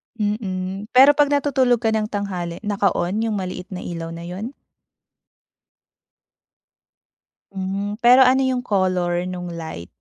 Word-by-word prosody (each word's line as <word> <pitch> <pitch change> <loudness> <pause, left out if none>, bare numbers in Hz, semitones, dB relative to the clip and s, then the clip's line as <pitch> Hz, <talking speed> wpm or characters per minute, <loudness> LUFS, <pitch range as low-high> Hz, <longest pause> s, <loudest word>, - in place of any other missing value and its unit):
Mm, 205 -2 -3
pero 270 +3 +9
kapag 290 0 +2
natutulog 260 -4 +1
ka 225 - +2
ng 215 -1 0
tanghali 185 -4 -4
naka-on 200 -1 0
yung 215 - -1
maliit 185 -1 -5
na 180 - -6
ilaw 165 -1 -5
na 170 - -8
yun? 200 +10 -6 3.0
Hmm, 195 +2 -3
pero 250 +2 +7
ano 265 +1 +3
yung 260 -1 0
color 185 -5 0
nung 180 -1 -5
light? 160 - -7
200 Hz, 125 wpm, -21 LUFS, 180-235 Hz, 3.0 s, pero